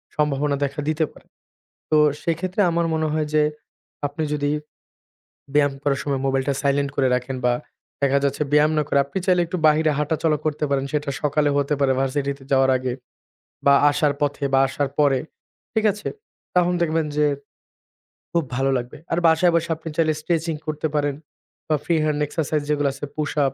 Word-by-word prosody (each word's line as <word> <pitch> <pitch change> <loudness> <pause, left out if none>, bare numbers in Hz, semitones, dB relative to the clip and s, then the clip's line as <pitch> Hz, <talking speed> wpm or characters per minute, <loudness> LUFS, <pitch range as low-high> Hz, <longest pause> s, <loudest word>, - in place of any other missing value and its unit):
সম্ভাবনা 145 -1 +1
দেখা 140 +1 -5
দিতে 155 0 +1
পারে। - - -19 0.6
তো, 155 - +4 0.3
সেক্ষেত্রে 180 +4 -1
আমার 170 0 +1
মনে 160 0 0
হয় 155 -1 0
যে 150 - +5 0.6
আপনি 145 +3 -4
যদি 145 -1 0 1.0
ব্যায়াম 145 -2 +3
করার 140 -2 +1
সময় 140 -2 -1
মোবাইল 135 0 +1
টা 140 - +2
সাইলেন্ট 140 0 +1
করে 130 - +3
রাখেন 125 +1 -2
বা 125 - +4 0.5
দেখা 140 0 +3
যাচ্ছে 140 +2 0
ব্যায়াম 150 +1 +5
না - - +3
করে 140 - +3
আপনি 140 +7 -4
চাইলে 180 -2 +4
একটু 180 +2 -3
বাহিরে 155 +1 +4
হাঁটা 150 +2 0
চলা 155 -2 +3
করতে 155 -1 -1
পারেন, 135 -1 +1
সেটা 150 -1 -1
সকালে 150 0 +2
হতে 145 +1 +1
পারে 135 -1 +3
ভার্সিটি 140 +1 0
তে 135 - -15
যাওয়ার 135 0 +4
আগে 130 -1 -2 0.7
বা 140 - +7 0.2
আসার 145 0 +1
পথে 145 0 -1
বা - - +6
আসার 140 +1 -1
পরে, 140 -3 +4 0.5
ঠিক 220 - +1
আছে? 210 - -6 0.5
তখন 180 0 +3
দেখবেন 160 -1 +1
যে, 150 - +4 1.1
খুব 170 -2 +2
ভালো 135 +1 +1
লাগবে। 120 0 -6
আর 165 - +2
বাসায় 165 +2 +4
বসে 170 0 0
আপনি 160 0 -7
চাইলে 155 -1 +3
স্ট্রেচিং 165 0 -1
করতে 155 +1 -1
পারেন 145 -1 +1 0.5
বা 155 - +2
ফ্রি 170 - +2
হ্যান্ড 150 -1 0
এক্সারসাইজ 150 0 -1
যেগুলো 145 -1 +2
আছে 145 - -6
পুশ 150 -1 -2
আপ, 135 - 0
150 Hz, 185 wpm, -22 LUFS, 140-160 Hz, 1.1 s, বা